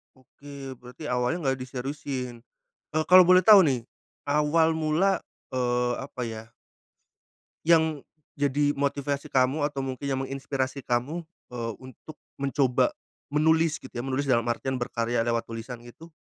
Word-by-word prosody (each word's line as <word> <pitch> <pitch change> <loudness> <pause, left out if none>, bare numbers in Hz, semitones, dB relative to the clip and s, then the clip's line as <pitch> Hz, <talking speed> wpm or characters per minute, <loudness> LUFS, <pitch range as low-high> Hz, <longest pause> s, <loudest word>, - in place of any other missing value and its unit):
Oke 135 0 -11
berarti 125 +4 -8
awalnya 125 +8 0
nggak 135 -1 0
diseriusin, 130 -1 -5 0.5
e 155 - -3
kalau 185 0 +9
boleh 185 0 +5
tahu 210 -3 +10
nih, 130 -8 +1 0.4
awal 150 +3 +3
mula, 160 +5 +1 0.3
eee, 125 -1 +1
apa 130 -1 -7
ya? 110 -1 -7 1.2
Yang, 160 -3 +3 0.3
jadi 145 +1 +1
motivasi 140 0 -2
kamu 130 +3 +2
atau 145 -2 -2
mungkin 135 +1 -5
yang 135 -1 -1
menginspirasi 135 0 -3
kamu 130 +8 -1 0.3
e - - -5 0.2
untuk 130 +4 -12 0.2
mencoba 135 - +2 0.4
menulis 160 +1 +3
gitu 130 - -13
ya 120 - -3
menulis 135 +1 -2
dalam 120 -3 +3
artian 130 +3 -2
berkarya 120 -1 -1
lewat 115 -1 0
tulisan 115 +2 -6
itu, 140 +8 -14
135 Hz, 135 wpm, -27 LUFS, 125-150 Hz, 1.2 s, tahu